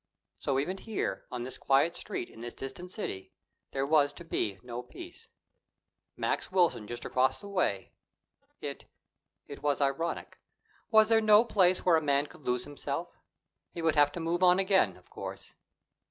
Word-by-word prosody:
So, 135 - 0
even 180 +8 -1
here, 220 0 -3
on 125 -1 -3
this 130 +1 -6
quiet 140 +5 +3
street 200 - -4
in 115 - -14
this 120 0 -6
distant 135 +7 -7
city, 140 - -5 0.4
there 135 0 -1
was 145 -1 +4
to 170 - -10
be 100 -11 -1
no 120 0 -5
peace. 350 - -11 0.9
Max - - -1
Wilson 175 - +2
just 120 +1 -6
across 130 +1 +2
the 200 - -10
way! 180 - -1 0.7
It - - -5 0.6
it - - -9
was 145 -2 +1
ironic. 140 +4 -1 0.5
Was 220 -1 +6
there 225 -1 +5
no 215 +1 +6
place 185 -5 +3
where 175 -3 +6
a - - 0
man 140 -1 +2
could 150 - -14
lose 125 0 +1
himself? 145 -1 -5 0.5
He 170 - -6
would 160 -1 +3
have 145 -1 +5
to - - -5
move 170 +2 -1
on 180 0 +6
again, 190 0 +3
of - - -22
course. - - -7
155 Hz, 170 wpm, -30 LUFS, 135-185 Hz, 0.9 s, Was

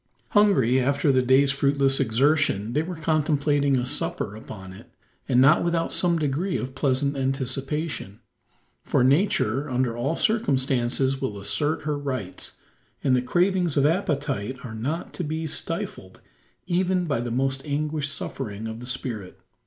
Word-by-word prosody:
Hungry 135 - +4
after 140 +2 +2
the 130 -1 +3
day's 130 +2 +4
fruitless 140 -1 +2
exertion, 125 -3 +2
they 150 - +2
were 175 +3 -5
contemplating 145 -3 +1
a 125 - 0
supper 105 - -1
upon 95 -3 -9
it, - - -14 0.4
and 125 - +4
not 140 +5 +6
without 170 -1 0
some 175 -2 +3
degree 155 +5 -1
of 130 0 -5
pleasant 140 +1 0
anticipation: 135 - -3 0.6
for - - +2
nature 145 - +2
under 125 -2 0
all 135 +7 -1
circumstances 135 - +1
will 105 -7 -3
assert 145 +11 0
her 150 -1 -2
rights, 130 -10 -5 0.5
and 130 -2 +3
the 125 - +2
cravings 175 +3 +1
of 140 - +4
appetite 145 - -1
are 115 - -7
not 135 +10 -4
to 180 - -4
be 160 +1 -3
stifled 155 - -4 0.5
even 180 0 +1
by 140 -7 0
the 120 - -3
most 135 +2 -1
anguished 150 0 -2
suffering 110 -7 -5
of 110 0 -5
the 125 - -9
spirit. 110 -7 -5
140 Hz, 150 wpm, -25 LUFS, 125-155 Hz, 0.6 s, not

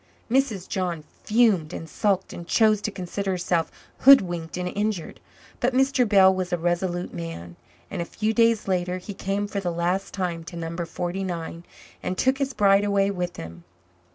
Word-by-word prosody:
Mrs. 240 -8 +1
John 175 -5 -2 0.2
fumed 210 -8 +3
and 165 - -6
sulked 190 +3 0
and 170 - -8
chose 215 -1 +3
to 210 - -2
consider 195 0 -4
herself 175 -3 0 0.3
hoodwinked 175 - +5
and 180 0 -2
injured. 205 -3 -3 0.4
But 250 +1 0
Mr. 265 -3 +3
Bell 190 -2 +6
was 185 -1 -3
a 175 - +1
resolute 175 +1 -1
man, 85 +1 -7 0.4
and - - -3
a - - -2
few 215 +5 -2
days 230 -2 +3
later 180 -1 0
he 185 +3 -8
came 195 +1 -2
for 200 -1 -3
the 185 -3 -2
last 175 +3 -1
time 175 -4 -3
to 170 - -9
No. 165 0 -5
49 175 -1 -4 0.4
and 185 - -3
took 265 +1 +2
his 275 -1 -2
bride 200 0 +4
away 200 -1 +2
with 180 -2 -4
him. 85 +1 -9
185 Hz, 175 wpm, -25 LUFS, 175-205 Hz, 0.4 s, Bell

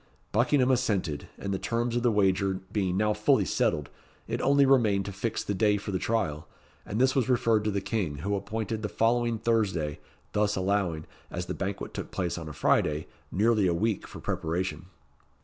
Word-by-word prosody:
Buckingham 130 +3 +3
assented, 95 - 0
and 100 0 -3
the 95 - -1
terms 120 0 -1
of 120 - +1
the 120 - +3
wager 95 -2 +2
being 95 -3 0
now 105 +1 +2
fully 105 +1 +3
settled, 75 -4 0 0.4
it - - -2
only 140 +1 +5
remained 110 -8 +3
to 100 - -4
fix 100 +4 -2
the 100 - -2
day 105 +1 +3
for 100 +1 -5
the 95 - -1
trial, 90 -10 -1 0.4
and 105 - -2
this 130 +1 +4
was 130 -3 +1
referred 115 -3 +3
to - - +2
the 100 -1 -1
King, 95 -9 -2
who 95 +9 -3
appointed 110 +2 -3
the 105 - -2
following 115 +1 +1
Thursday 100 -10 0 0.3
thus 105 0 +1
allowing, 95 -4 0 0.2
as 90 +1 -4
the - - -4
banquet 95 0 -4
took - - -5
place 90 -1 -2
on 80 -2 -7
a - - -7
Friday, 75 +1 +1 0.3
nearly 105 0 +3
a 85 - +1
week 105 +3 -1
for - - -10
preparation. 90 +3 -2
105 Hz, 190 wpm, -28 LUFS, 95-115 Hz, 0.4 s, only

